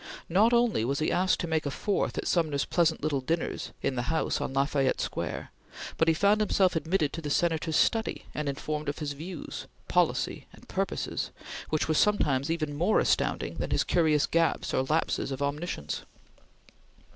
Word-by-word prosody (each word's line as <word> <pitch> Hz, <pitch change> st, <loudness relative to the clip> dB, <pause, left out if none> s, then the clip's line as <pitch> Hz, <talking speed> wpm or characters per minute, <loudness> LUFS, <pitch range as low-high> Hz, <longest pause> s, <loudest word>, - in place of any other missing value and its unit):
Not 205 Hz, +7 st, +4 dB
only 235 Hz, -, +3 dB
was 135 Hz, +4 st, 0 dB
he 155 Hz, -, 0 dB
asked 185 Hz, +1 st, +2 dB
to 175 Hz, -, -2 dB
make 160 Hz, -2 st, 0 dB
a -, -, 0 dB
fourth 200 Hz, +8 st, -1 dB
at -, -, -2 dB
Sumner's 155 Hz, -5 st, +1 dB
pleasant 165 Hz, -4 st, +1 dB
little 145 Hz, -3 st, 0 dB
dinners 165 Hz, +6 st, -2 dB
in -, -, +1 dB
the 120 Hz, -, 0 dB
house 160 Hz, 0 st, 0 dB
on -, -, -2 dB
La 135 Hz, +1 st, +2 dB
Fayette 140 Hz, -3 st, +1 dB
Square, -, -, -3 dB, 0.5 s
but 165 Hz, -, +3 dB
he 165 Hz, -, +4 dB
found 205 Hz, +5 st, +3 dB
himself 190 Hz, -3 st, +3 dB
admitted 160 Hz, -2 st, 0 dB
to 165 Hz, -, -4 dB
the 150 Hz, -, -4 dB
Senator's 160 Hz, 0 st, +1 dB
study 225 Hz, +6 st, +1 dB
and 150 Hz, -1 st, -2 dB
informed 150 Hz, +2 st, -3 dB
of 145 Hz, -, -3 dB
his 145 Hz, -2 st, -3 dB
views, 165 Hz, +3 st, -7 dB, 0.2 s
policy -, -, +1 dB
and -, -, -17 dB
purposes, -, -, -2 dB, 0.4 s
which 155 Hz, -, 0 dB
were 160 Hz, -, +2 dB
sometimes 150 Hz, -7 st, +2 dB
even 155 Hz, -3 st, -1 dB
more 175 Hz, +8 st, +3 dB
astounding -, -, 0 dB
than -, -, -2 dB
his -, -, +2 dB
curious 155 Hz, -4 st, +3 dB
gaps 165 Hz, -2 st, +1 dB
or -, -, +2 dB
lapses 155 Hz, +1 st, 0 dB
of 135 Hz, -, -4 dB
omniscience. 140 Hz, -, -3 dB
160 Hz, 180 wpm, -28 LUFS, 145-175 Hz, 0.5 s, Not